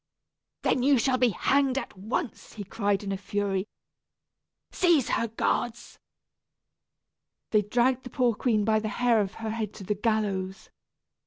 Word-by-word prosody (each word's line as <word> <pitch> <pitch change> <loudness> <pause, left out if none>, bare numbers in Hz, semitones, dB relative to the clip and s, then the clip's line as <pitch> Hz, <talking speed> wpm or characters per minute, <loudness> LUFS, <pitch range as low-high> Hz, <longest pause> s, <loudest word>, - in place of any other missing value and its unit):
"Then 255 - +2
you 275 +1 +4
shall 255 +2 +1
be 250 -1 +4
hanged 270 +5 +1
at 270 - -4
once," 220 - -4
he 210 - -6
cried 200 0 -1
in 200 - -3
a 195 - -1
fury. 200 0 -2 1.0
"Seize 335 -9 +3
her, 230 - +1
guards." 235 +1 -2 1.5
They 215 - +4
dragged 245 +5 +1
the 250 - -8
poor 245 -1 +2
queen 215 -2 +1
by 215 0 +3
the 215 0 -3
hair 235 -1 +2
of 195 -1 -4
her 225 -1 -4
head 220 -2 -4
to 200 - -9
the 210 - 0
gallows. 200 -3 -2
220 Hz, 155 wpm, -27 LUFS, 205-245 Hz, 1.5 s, you